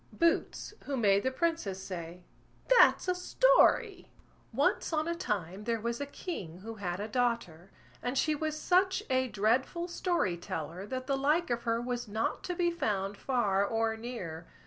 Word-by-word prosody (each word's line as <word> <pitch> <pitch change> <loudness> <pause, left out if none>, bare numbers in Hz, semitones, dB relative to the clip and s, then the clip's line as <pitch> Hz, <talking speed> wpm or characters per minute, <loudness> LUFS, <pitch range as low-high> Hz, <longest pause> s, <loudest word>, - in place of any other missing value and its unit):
BOOTS, 335 +4 0
WHO 280 -1 -2
MADE 200 -4 +4
THE 260 - +1
PRINCESS 260 - -1
SAY, 175 -1 -7 0.5
"THAT'S - - +6
A 365 - +3
STORY" 435 0 +3 0.4
Once - - +1
on 310 0 0
a 340 - 0
time 200 - -3
there 230 -1 0
was 235 +3 -3
a 285 - -3
king 185 - -6
who 225 +3 -7
had 175 -1 -2
a 210 - -3
daughter, 225 -7 -1 0.3
and 250 +2 -2
she 310 - +2
was 310 +1 -2
such 375 +4 +2
a 260 0 +2
dreadful 245 - 0
story 345 - 0
teller 170 +3 -5
that 255 +3 -4
the 275 0 0
like 295 +4 +1
of 235 0 0
her 230 0 +1
was 240 0 -3
not 220 +2 -2
to 360 - -3
be 345 -1 +1
found 205 - -1
far 205 -6 +1
or 225 +2 0
near. 185 -9 -6
240 Hz, 170 wpm, -31 LUFS, 200-320 Hz, 0.5 s, THAT'S